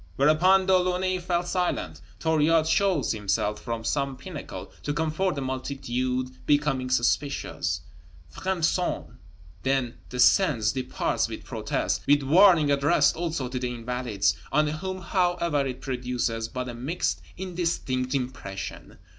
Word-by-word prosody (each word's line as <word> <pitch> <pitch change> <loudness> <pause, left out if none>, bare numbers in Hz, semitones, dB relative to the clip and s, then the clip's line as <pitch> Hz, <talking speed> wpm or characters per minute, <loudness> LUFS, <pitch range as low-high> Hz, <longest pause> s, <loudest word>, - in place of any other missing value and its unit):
Whereupon 175 +7 +4
De 190 0 +4
Launay 185 0 +1
fell 175 0 0
silent. 175 - -2 0.2
Thuriot 160 0 +3
shows 175 -3 +2
himself 105 0 -1
from 115 -2 -4
some 135 +3 -1
pinnacle 165 0 -8
to 145 - -3
comfort 160 +4 0
the 140 - -3
multitude 130 -1 -2 0.2
becoming 145 -3 +2
suspicious, 130 +3 0 0.5
fremes 185 -3 -1
cent, 180 -1 -1 0.6
then 130 -1 0
descends, 125 - +4
departs 130 -1 -1
with - - -7
protest, - - -1
with 145 0 +4
warning 160 0 +6
addressed 140 +1 +3
also 165 -6 -2
to 125 0 -3
the 125 0 -2
Invalides, 120 -4 -1 0.2
on 150 +2 +3
whom 185 +5 -4
however 170 -6 +1
it 130 -1 -6
produces 125 -3 -2
but 125 +1 -4
a 120 - -5
mixed, 135 +9 -2 0.2
indistinct 165 -8 -2
impression. 125 -7 -5
140 Hz, 130 wpm, -26 LUFS, 125-175 Hz, 0.6 s, warning